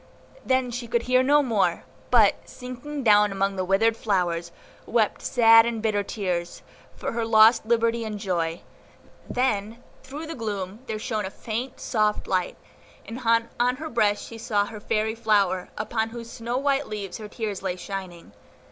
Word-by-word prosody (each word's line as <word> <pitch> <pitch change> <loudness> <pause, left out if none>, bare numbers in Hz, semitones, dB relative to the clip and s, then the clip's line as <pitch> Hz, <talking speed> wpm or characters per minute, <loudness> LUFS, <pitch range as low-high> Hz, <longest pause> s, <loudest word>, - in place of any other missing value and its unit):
Then 260 -1 +1
she 240 0 -5
could 235 0 0
hear 255 +1 +3
no 290 +3 +4
more, 220 -7 +1 0.3
but, - - +6 0.2
sinking 260 +3 -7
down 210 -2 +5
among 195 0 0
the 185 - -1
withered 205 +5 +2
flowers, 175 -6 -1 0.4
wept 220 -3 +1
sad 225 -1 +6
and 235 -1 -2
bitter 215 -2 0
tears, 180 -4 -3 0.3
for - - -4
her 230 0 -2
lost 220 0 +5
liberty 230 0 +2
and 215 -1 -4
joy; 170 -4 -2 0.7
then 230 -2 -1 0.2
through 285 +4 -8
the 325 - -6
gloom 205 - -4
there 220 -1 -3
shone 215 -2 -3
a - - -5
faint, 240 +6 -5
soft 215 -2 0
light, 185 -2 -1 0.5
and 230 +2 -7 0.4
on 250 +1 +2
her 315 +4 -6
breast 210 -3 +1
she 230 - -10
saw 205 -2 0
her 215 0 -8
fairy 215 +1 -1
flower, 205 -5 +1
upon 220 +1 -1
whose 230 0 -9
snow 235 +2 -3
white 280 +1 0
leaves 200 -3 -6
her 215 - -7
tears 210 -3 -4
lay 185 -2 -2
shining. 180 - -7
220 Hz, 165 wpm, -25 LUFS, 200-235 Hz, 0.7 s, but